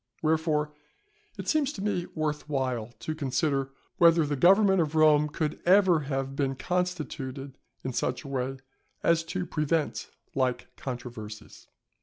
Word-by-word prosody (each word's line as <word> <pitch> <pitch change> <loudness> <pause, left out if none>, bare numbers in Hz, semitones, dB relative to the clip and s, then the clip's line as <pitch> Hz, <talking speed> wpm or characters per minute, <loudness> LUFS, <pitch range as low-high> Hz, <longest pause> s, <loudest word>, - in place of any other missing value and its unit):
Wherefore, 155 -1 +1 0.6
it - - -6
seems 300 -3 +2
to 195 - -7
me 190 -4 -1
worth 150 -1 -2
while 130 -6 -1
to 155 - -3
consider 140 -1 0 0.3
whether 165 -2 +6
the 145 0 -1
government 190 +5 +5
of 155 -1 -2
Rome 150 -1 +5
could 150 0 -3
ever 185 -2 +5
have 135 -2 -3
been 135 -1 0
constituted 140 -6 -3 0.3
in 130 - -3
such 125 +1 -1
a - - -9
way 135 0 -2 0.5
as 165 0 +3
to 180 +2 -3
prevent 155 -1 -1 0.2
like 125 -2 -1
controversies. 115 -4 -8
150 Hz, 140 wpm, -28 LUFS, 135-165 Hz, 0.6 s, whether